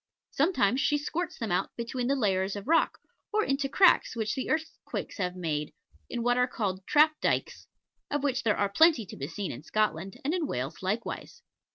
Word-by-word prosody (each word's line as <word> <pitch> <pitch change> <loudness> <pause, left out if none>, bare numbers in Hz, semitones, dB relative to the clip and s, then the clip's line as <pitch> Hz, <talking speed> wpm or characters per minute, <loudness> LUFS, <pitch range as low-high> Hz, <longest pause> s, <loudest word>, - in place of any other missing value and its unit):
Sometimes 270 - +2
she 295 - +2
squirts 330 +4 -3
them 225 -5 -3
out 180 +2 -1
between 240 +1 -3
the 275 - +2
layers 195 -5 +1
of 205 +3 -7
rock, 330 +1 +3 0.3
or 430 0 +2
into 275 0 0
cracks 370 -3 +4
which 220 -2 -1
the 260 - -3
earthquakes 315 +1 -3
have 180 -1 -1
made, 155 -4 -3 0.3
in 240 -1 -3
what 245 +1 +2
are 250 0 +3
called 195 -6 -3
trap 305 +1 +6
dykes, - - -1 0.4
of 290 -1 -1
which 260 -2 +1
there 220 -3 +1
are 200 - +2
plenty 270 +3 +4
to - - -10
be 140 - -5
seen 185 +4 -4
in 120 - -7
Scotland, 195 0 -1
and 300 - +1
in 345 -5 0
Wales 130 - -4
likewise. 205 +5 -4
235 Hz, 195 wpm, -29 LUFS, 195-290 Hz, 0.4 s, trap